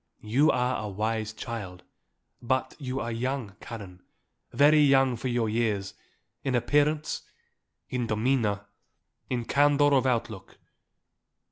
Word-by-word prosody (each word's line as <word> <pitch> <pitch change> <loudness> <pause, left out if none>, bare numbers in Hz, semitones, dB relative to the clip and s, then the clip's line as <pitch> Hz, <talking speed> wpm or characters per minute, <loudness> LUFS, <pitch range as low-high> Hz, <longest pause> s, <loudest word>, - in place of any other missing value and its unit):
You 130 +8 +3
are 125 -3 +1
a 105 - -4
wise 110 +2 -2
child; 100 -5 -7 0.6
but 130 +1 -1
you 130 -2 -3
are 120 -1 -3
young, 120 -3 -3
Karen, 100 -6 -9 0.5
very 150 +2 +5
young 135 -3 +4
for 120 - -4
your 120 -2 0
years, 105 -3 -1 0.5
in 130 -2 0
appearance, 145 +4 +1 0.7
in 125 -2 -2
demeanour, 110 -2 0 0.6
in 120 -2 -2
candour 145 +1 +4
of 130 -1 +3
outlook. 115 -5 -3
120 Hz, 120 wpm, -27 LUFS, 110-135 Hz, 0.7 s, very